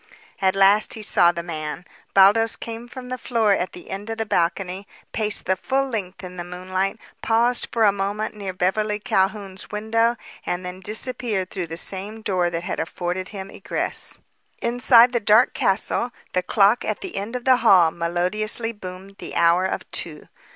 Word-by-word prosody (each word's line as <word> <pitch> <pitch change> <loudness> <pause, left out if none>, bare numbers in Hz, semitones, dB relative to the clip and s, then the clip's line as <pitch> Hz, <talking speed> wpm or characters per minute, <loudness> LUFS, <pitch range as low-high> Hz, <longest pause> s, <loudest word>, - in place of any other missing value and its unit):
At 190 0 +2
last 195 +2 +4
he 220 - -6
saw 175 -4 +7
the 170 0 -5
man. 155 0 -5 0.3
Baldos 210 +4 +5
came 230 +1 -7
from 250 0 -9
the 255 0 -4
floor 225 -4 +2
at 185 -1 -2
the 175 - -11
end 200 +3 -6
of 225 - -4
the 225 - -2
balcony, 185 +1 -1 0.3
paced 215 -1 0
the 190 - +2
full 270 +7 -1
length 195 -6 -5
in 180 0 -9
the 175 - -4
moonlight, 185 +3 -3 0.2
paused 235 +2 +1
for 230 - +1
a 205 - +6
moment 200 +2 -3
near 200 -3 -5
Beverly 210 +4 0
Calhoun's 195 -1 -1
window 225 +3 +1 0.3
and 180 +1 -3
then 180 +1 -7
disappeared 215 -1 -2
through 180 -4 -4
the 165 0 -6
same 205 +5 -4
door 180 -4 +1
that 170 0 -4
had - - -4
afforded 180 +2 -3
him 195 -2 -8
egress. - - -1 0.4
Inside 240 0 +5
the 240 - +1
dark 215 +3 +4
castle 210 +4 +1 0.2
the 185 - +2
clock 200 +5 +3
at 215 - -3
the - - -6
end 205 +5 -4
of 245 - -5
the 260 -1 +5
hall 185 -8 +5
melodiously 180 +7 -1
boomed 195 -1 -10
the - - -8
hour 170 +2 +4
of 190 - -3
two. - - -2
195 Hz, 180 wpm, -22 LUFS, 185-225 Hz, 0.4 s, saw